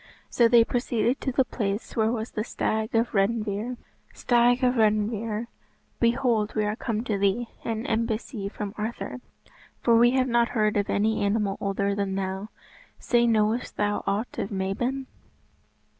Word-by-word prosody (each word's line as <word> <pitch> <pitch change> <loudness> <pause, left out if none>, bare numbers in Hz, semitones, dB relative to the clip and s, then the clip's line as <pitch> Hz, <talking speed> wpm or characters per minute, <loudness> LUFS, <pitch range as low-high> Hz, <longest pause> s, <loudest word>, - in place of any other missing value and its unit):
So 235 - +5
they 230 0 +6
proceeded 240 +1 0
to 265 - -1
the 260 +1 +2
place 205 -3 -3
where 220 -1 +2
was 225 -1 -3
the 215 - -2
Stag 220 0 -2
of 230 +1 +2
Redynvre. 215 +3 0 0.4
"Stag 245 +1 +3
of 250 0 +4
Redynvre, 215 0 +1 0.5
behold 235 -3 +1
we 215 -1 +1
are 210 +1 -1
come 225 -1 -2
to 210 -5 -2
thee, 200 +4 +1
an 225 0 -3
embassy 220 -1 -2
from 205 -1 -6
Arthur, 235 +3 -4 0.6
for 235 - +5
we 240 +1 +6
have 260 0 +2
not 235 -1 +2
heard 215 -1 +2
of 205 -1 0
any 220 +2 +1
animal 200 -1 +1
older 200 0 0
than 200 -1 -2
thou. 190 +2 -3 0.5
Say, 240 -1 +2
knowest 220 +1 +1
thou 205 0 0
aught 205 +4 -2
of - - -2
Mabon?" 225 +8 -2
220 Hz, 160 wpm, -26 LUFS, 205-240 Hz, 0.6 s, they